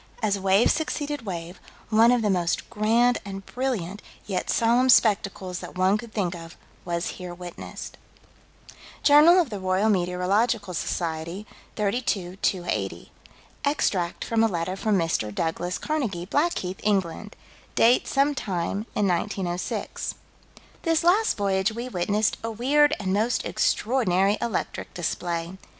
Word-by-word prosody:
"As 200 -2 +1
wave 195 +3 +4
succeeded 290 -5 -3
wave, 175 -1 -5 0.3
one 225 +2 +6
of 245 -2 +2
the 210 - +2
most 175 -2 -1
grand 235 +3 +3
and 195 -1 -7
brilliant, 215 -7 -3 0.2
yet 190 -3 -3
solemn, 240 +3 +3
spectacles 195 -6 +3
that - - -9
one 185 +2 +3
could 230 0 -9
think 190 -5 -1
of, 165 -1 -10 0.3
was 170 -1 -2 0.2
here 180 -1 -6
witnessed." 175 -1 -8 1.1
Jour. 290 0 +7 0.3
Roy. 190 +1 0
Met. 185 +3 +2 0.2
Soc., 160 -1 -2 0.5
32 200 -4 -1
280: 180 -3 -2 0.5
Extract 195 - 0
from 225 -1 +2
a - - +5
letter 180 -2 -2
from 210 +1 +1
Mr. 165 - 0
Douglas 170 - -2
Carnegie, 230 - -2
Blackheath, 195 - -1
England. 200 0 -1 0.4
Date 240 +2 +4
some 280 +1 +2
time 200 -2 -3
in 210 - +2
1906 180 0 -2 0.7
"This 330 0 +1
last 400 +6 +3
voyage 195 0 +1
we 235 +2 -5
witnessed 205 +2 0
a 230 - -2
weird 290 +7 +3
and 190 -2 -1
most 220 +4 +1
extraordinary 205 -4 +1
electric 230 -5 -3
display." 175 +1 -3
200 Hz, 130 wpm, -25 LUFS, 180-235 Hz, 1.1 s, Jour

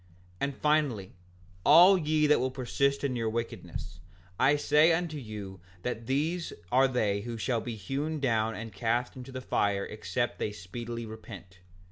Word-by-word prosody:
5:56 90 - -29 0.3
And 140 0 -1
finally, 145 -11 +1 0.5
all 175 +6 +8
ye 155 -3 +2
that 150 0 +5
will 130 +1 0
persist 140 +2 0
in 135 -3 0
your 115 -2 0
wickedness, 115 -6 -5 0.4
I 145 +2 +5
say 150 +3 +4
unto 165 -2 -1
you 105 -6 -7 0.2
that 115 -2 -4
these 160 +6 0 0.2
are 130 +2 +5
they 105 -6 0
who 115 +2 -5
shall 115 +1 0
be 120 0 -5
hewn 140 +10 -3
down 115 -4 +1
and 115 -1 -7
cast 120 +3 -1
into 130 0 -9
the 130 0 -5
fire 100 -4 0
except 120 +3 -3
they 105 - -2
speedily 115 +4 -6
repent. 100 -5 -10
120 Hz, 165 wpm, -29 LUFS, 110-145 Hz, 0.5 s, all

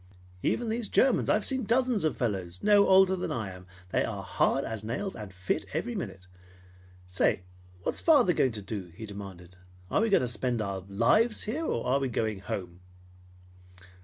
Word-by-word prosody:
"Then 235 -2 0
these 225 -1 -2
Germans. 260 -2 +3
I've 210 - +2
seen 265 -1 +2
dozens 240 -1 +2
of 155 - 0
fellows 95 -7 -3
no 205 -1 +5
older 190 0 +6
than 180 - -3
I 110 -5 -3
am. 90 0 -12 0.2
They - - +2
are - - -4
hard - - +1
as 110 -2 -5
nails 185 - -3
and 105 -3 -8
fit 95 0 -2
every 200 +11 -2
minute. 95 - -6 0.8
Say, 90 0 +1 0.4
what's - - -2
father 275 - +5
going 130 -6 +2
to 105 -2 -6
do?" 95 -3 -6
he 110 - -7
demanded. 95 -3 -10 0.3
"Are - - +3
we 225 - +2
going 200 - +4
to 125 - 0
spend 120 +1 -1
our 100 -2 -2
lives 170 - +3
here, 295 +10 -2
or 115 - -1
are 135 +2 +2
we 135 -1 -1
going 110 -3 -1
home?" 90 -2 -5
120 Hz, 185 wpm, -29 LUFS, -, 0.8 s, older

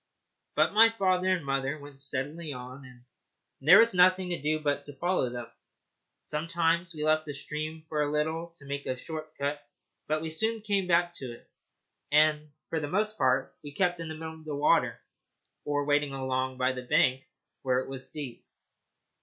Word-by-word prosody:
But - - +3
my 225 +1 +8
father 185 -4 +1
and 185 -5 +1
mother 135 +1 -1
went 145 -2 -12
steadily 145 +4 -4
on, 130 +1 -8
and 125 -1 -15 0.6
there 165 +8 +8
was 230 0 +6
nothing 185 0 +4
to 175 - -3
do 155 +2 +1
but 145 -1 -1
to 145 - -8
follow 175 -7 0
them. 120 -1 -5 0.8
Sometimes 165 +2 0
we 150 - -4
left 155 0 +2
the 145 - -4
stream 155 +2 -5
for 150 -1 -1
a 145 - +1
little 160 +3 -1
to 140 - -14
make 140 0 -4
a 130 - -1
short 155 +2 -7
cut, 145 +1 -2 0.4
but 155 +1 0
we 160 - -4
soon 220 +6 -1
came 200 -3 0
back 175 0 +3
to 130 -3 -6
it, 120 - -16 0.6
and 150 0 +4 0.2
for 160 - 0
the 150 - -3
most 210 +6 0
part 130 -5 +1
we 145 -1 -9
kept 175 -2 +1
in 165 - -5
the 160 - -5
middle 160 0 -6
of 160 0 -14
the 150 -2 -3
water, 140 -4 +2 0.7
or 145 -1 0
wading 145 -1 +2
along 130 -1 -2
by 130 0 +2
the 130 -1 -5
bank 125 +1 +3 0.4
where 130 -1 +1
it 130 - -1
was 135 -1 -7
deep. 140 -6 -7
150 Hz, 190 wpm, -29 LUFS, 135-170 Hz, 0.8 s, my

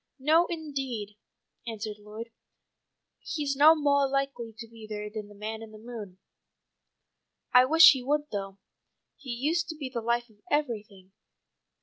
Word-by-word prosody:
"No, 315 +5 +4
indeed," 270 - -4 0.5
answered 215 -2 -5
Lloyd. 215 +3 -9 0.9
"He's 290 -3 -2
no 305 +4 +7
moah 285 -2 +3
likely 275 -4 -2
to 230 0 -8
be 225 -1 -12
there 210 -1 -5
than 215 -1 -6
the 205 - -15
man 220 +2 -5
in 225 - -9
the 215 - -12
moon. 215 -5 -9 1.4
I 250 0 +8
wish 320 +4 +9
he 265 -4 -1
would 295 +3 -1
though. 195 -1 -4 0.6
He 275 - -12
used 305 +8 0
to 320 - -4
be 280 -4 -5
the 235 - -2
life 235 +1 0
of 210 - -25
everything. 215 -10 -2
240 Hz, 150 wpm, -28 LUFS, 215-285 Hz, 1.4 s, wish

